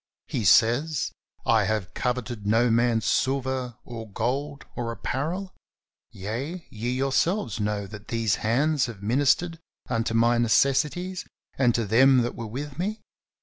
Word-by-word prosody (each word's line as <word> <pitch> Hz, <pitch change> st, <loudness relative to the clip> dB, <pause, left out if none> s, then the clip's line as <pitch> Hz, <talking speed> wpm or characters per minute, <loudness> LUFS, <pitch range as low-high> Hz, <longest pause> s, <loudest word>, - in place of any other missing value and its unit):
He 110 Hz, -, -2 dB
says: 125 Hz, -, +4 dB, 0.3 s
"I 110 Hz, -3 st, +4 dB
have 105 Hz, -2 st, -2 dB
coveted 120 Hz, -4 st, -3 dB
no 115 Hz, +3 st, +3 dB
man's 115 Hz, -1 st, +2 dB
silver 130 Hz, -2 st, 0 dB
or 115 Hz, -2 st, -8 dB
gold 140 Hz, +7 st, -2 dB
or 120 Hz, -2 st, -3 dB
apparel; 160 Hz, -, -3 dB, 0.6 s
yea, 130 Hz, -, -5 dB
ye 115 Hz, +3 st, -3 dB
yourselves 135 Hz, -, 0 dB
know 105 Hz, -1 st, -1 dB
that 105 Hz, +1 st, -10 dB
these 115 Hz, -3 st, 0 dB
hands 135 Hz, +5 st, +2 dB
have 105 Hz, -4 st, -9 dB
ministered 145 Hz, +8 st, +2 dB, 0.3 s
unto 115 Hz, -2 st, -1 dB
my 120 Hz, +1 st, +4 dB
necessities 150 Hz, +10 st, +1 dB, 0.3 s
and 125 Hz, -3 st, +3 dB
to 115 Hz, -, 0 dB
them 125 Hz, +4 st, +5 dB
that 120 Hz, -, -2 dB
were 115 Hz, -, -5 dB
with 140 Hz, +5 st, -6 dB
me. 210 Hz, +4 st, -2 dB
120 Hz, 140 wpm, -26 LUFS, 115-140 Hz, 0.6 s, them